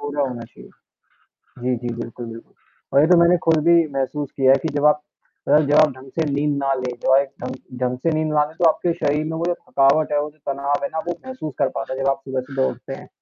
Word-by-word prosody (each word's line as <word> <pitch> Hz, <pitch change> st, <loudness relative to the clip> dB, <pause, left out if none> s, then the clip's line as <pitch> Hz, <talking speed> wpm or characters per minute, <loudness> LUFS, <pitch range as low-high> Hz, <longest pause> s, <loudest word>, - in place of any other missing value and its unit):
पूरा 145 Hz, 0 st, -2 dB
होना 125 Hz, -4 st, -3 dB
चाहिए। 115 Hz, -, -14 dB, 0.9 s
जी, 125 Hz, 0 st, +1 dB
जी। 120 Hz, 0 st, -4 dB
बिल्कुल, 120 Hz, +1 st, -7 dB
बिल्कुल, 115 Hz, 0 st, -11 dB, 0.4 s
और 140 Hz, -, +6 dB
ये 155 Hz, -, +4 dB
तो 180 Hz, 0 st, +6 dB
मैंने 175 Hz, +1 st, +5 dB
खुद 165 Hz, -1 st, +4 dB
भी 170 Hz, -2 st, +5 dB
महसूस 135 Hz, +1 st, -2 dB
किया 130 Hz, -1 st, +5 dB
है 135 Hz, -, +6 dB
कि 145 Hz, -, -5 dB
जब 145 Hz, -, +1 dB
आप 150 Hz, 0 st, +4 dB, 0.5 s
जब 145 Hz, 0 st, +4 dB
आप 155 Hz, -, +6 dB
ढंग 130 Hz, +1 st, -13 dB
से 165 Hz, -, -1 dB
नींद 145 Hz, +1 st, 0 dB
ना 140 Hz, -1 st, 0 dB
लें, 130 Hz, -1 st, -3 dB
जब -, -, 0 dB
आप 135 Hz, -, +7 dB
एक 140 Hz, -, -6 dB
ढंग 130 Hz, +1 st, -4 dB, 0.3 s
ढंग 125 Hz, 0 st, 0 dB
से 165 Hz, -, +3 dB
नींद 155 Hz, 0 st, 0 dB
लें, 150 Hz, +1 st, +1 dB
तो 175 Hz, -, +3 dB
आपके 170 Hz, +2 st, 0 dB
शरीर 150 Hz, -2 st, 0 dB
में 160 Hz, -, -4 dB
वो 165 Hz, -, -2 dB
जो 175 Hz, -, +1 dB
थकावट 140 Hz, 0 st, +2 dB
है, 145 Hz, -, +2 dB
वो 150 Hz, -, -4 dB
जो 150 Hz, -, -25 dB
तनाव 140 Hz, +1 st, -1 dB
है -, -, +1 dB
ना, 160 Hz, -, -3 dB
वो 175 Hz, -, 0 dB
महसूस 260 Hz, -, -6 dB
कर -, -, +2 dB
पाता 135 Hz, -, -4 dB
है, 130 Hz, -, -5 dB
जब 135 Hz, -, +1 dB
आप 135 Hz, 0 st, -1 dB
सुबह-सुबह 130 Hz, 0 st, -1 dB
उठते 125 Hz, +2 st, -8 dB
हैं। -, -, -10 dB
140 Hz, 260 wpm, -21 LUFS, 130-155 Hz, 0.9 s, आप